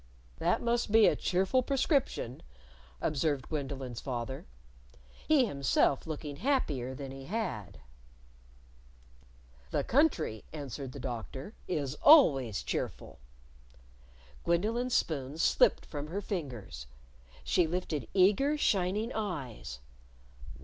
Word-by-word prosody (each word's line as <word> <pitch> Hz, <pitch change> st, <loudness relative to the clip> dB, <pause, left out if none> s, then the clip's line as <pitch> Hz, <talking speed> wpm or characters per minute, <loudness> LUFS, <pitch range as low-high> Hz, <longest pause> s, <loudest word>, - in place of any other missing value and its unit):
"That -, -, +1 dB
must 235 Hz, -2 st, 0 dB
be 220 Hz, -1 st, +7 dB
a -, -, +4 dB
cheerful 190 Hz, +8 st, +1 dB
prescription," 270 Hz, -, 0 dB, 0.6 s
observed 145 Hz, -3 st, 0 dB
Gwendolyn's 135 Hz, -5 st, -4 dB
father. 130 Hz, -, -4 dB, 0.8 s
He 300 Hz, -5 st, +5 dB
himself 140 Hz, -, +1 dB
looking 150 Hz, -2 st, -5 dB
happier 150 Hz, -, 0 dB
than 135 Hz, 0 st, -7 dB
he 135 Hz, 0 st, -9 dB
had. 110 Hz, -, -4 dB, 1.9 s
"The 140 Hz, -, 0 dB
country," 230 Hz, -, +1 dB
answered 140 Hz, -3 st, -6 dB
the 140 Hz, -, -8 dB
Doctor, 130 Hz, -, -6 dB
"is 145 Hz, -6 st, -1 dB
always 135 Hz, -, +6 dB
cheerful." -, -, -4 dB, 1.2 s
Gwendolyn's 225 Hz, +9 st, +1 dB
spoon 145 Hz, -2 st, -1 dB
slipped 165 Hz, -, +3 dB
from 145 Hz, -1 st, -6 dB
her 180 Hz, +6 st, -3 dB
fingers. 130 Hz, -, -5 dB, 0.6 s
She 175 Hz, -, +2 dB
lifted 165 Hz, -3 st, -3 dB
eager, 210 Hz, +11 st, +4 dB
shining 205 Hz, -1 st, +1 dB
eyes. 135 Hz, -, -5 dB
155 Hz, 100 wpm, -31 LUFS, 130-210 Hz, 1.9 s, be